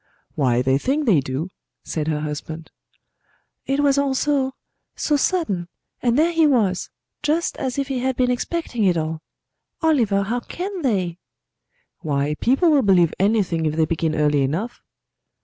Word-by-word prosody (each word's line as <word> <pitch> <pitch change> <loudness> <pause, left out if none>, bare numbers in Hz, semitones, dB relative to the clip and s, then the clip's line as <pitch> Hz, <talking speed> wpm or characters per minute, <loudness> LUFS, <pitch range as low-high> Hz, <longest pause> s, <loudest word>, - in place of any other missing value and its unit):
"Why, 125 -4 +1
they 135 +1 +2
think 285 - 0
they 195 - +5
do," 135 +6 -3 0.3
said 155 -2 -3
her 150 -1 -1
husband. 155 +2 -6 1.0
"It 275 +1 +1
was 280 -1 +3
all 275 -1 +1
so 270 -2 0 0.4
so 300 - +1
sudden; 280 - 0 0.3
and 240 0 +2
there 325 +3 +3
he 325 -2 +4
was, 210 -10 +1 0.3
just 310 +3 0
as 260 -1 -3
if 275 -1 -1
he 270 -2 -2
had 260 +1 0
been 250 0 +2
expecting 250 -2 -2
it 180 -3 +3
all. 160 0 -3 0.6
Oliver, 230 -11 +3
how 230 +5 -1
can 370 - -5
they?" 185 - -1 0.8
"Why, 145 -1 -1
people 275 +7 +3
will 290 -2 +5
believe 185 -7 +4
anything 190 -6 +1
if 155 - -1
they 160 0 +3
begin 160 0 -1
early 150 -2 +2
enough." 165 - -2
215 Hz, 160 wpm, -22 LUFS, -, 1.0 s, they